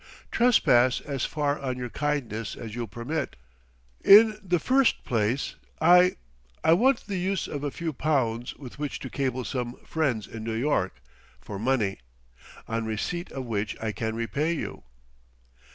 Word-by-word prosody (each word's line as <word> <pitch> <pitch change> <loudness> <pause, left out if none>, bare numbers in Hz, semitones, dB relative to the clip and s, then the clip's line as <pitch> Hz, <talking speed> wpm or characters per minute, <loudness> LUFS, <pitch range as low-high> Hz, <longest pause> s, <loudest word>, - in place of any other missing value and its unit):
"Trespass 130 - +4
as 140 -3 -3
far 145 -1 -1
on 130 -2 -3
your 125 -2 -5
kindness 130 -8 -2
as 110 -2 -8
you'll 120 0 -4
permit. 120 +9 -4 0.7
In 215 +1 +8
the 180 -3 +1
first 260 - +2
place, 115 +3 0 0.3
I 180 +2 +6 0.5
I 160 - +6
want 260 +10 +3
the 200 -2 -3
use 190 0 -1
of 145 -1 -5
a 145 - 0
few 160 +2 -4
pounds 125 -5 0
with 135 -1 -11
which 145 -1 -3
to 130 - -6
cable 130 -2 -1
some 125 -2 -3
friends 135 -10 0
in 110 -1 -8
New 115 0 -3
York, 115 - 0 0.4
for 95 +10 -7
money; 110 -4 0 0.7
on 115 0 -1
receipt 140 +11 -3
of 130 -1 -5
which 105 -2 -3
I 110 -1 -2
can 110 +1 -3
repay 140 +8 -1
you." 165 - -5
130 Hz, 155 wpm, -27 LUFS, 115-160 Hz, 0.7 s, In